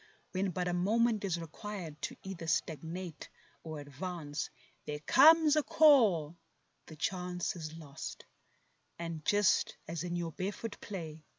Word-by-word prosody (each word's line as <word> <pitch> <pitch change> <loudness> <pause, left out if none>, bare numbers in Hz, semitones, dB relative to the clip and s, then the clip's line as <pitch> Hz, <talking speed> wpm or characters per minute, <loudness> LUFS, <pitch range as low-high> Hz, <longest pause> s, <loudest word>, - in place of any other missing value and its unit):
When 195 +1 0
but 180 0 -2
a 175 - 0
moment 215 +4 +2
is 180 -4 0
required 165 -2 -7
to - - -3
either 185 -4 -6
stagnate 165 +1 -3 0.3
or 155 -2 -6
advance; 145 +1 -5 0.4
There 150 - -2
comes 305 - +7
a 305 - +4
call; 210 - +5 0.5
the 160 - -10
chance 180 +3 -2
is 160 -1 -6
lost, 145 -4 -8 0.7
and 165 -2 -5
just 205 +1 +3
as 165 +1 -3
in 175 -1 -3
your 170 -1 -2
barefoot 205 +5 -4
play. 160 -6 -7
175 Hz, 135 wpm, -33 LUFS, 160-200 Hz, 0.7 s, comes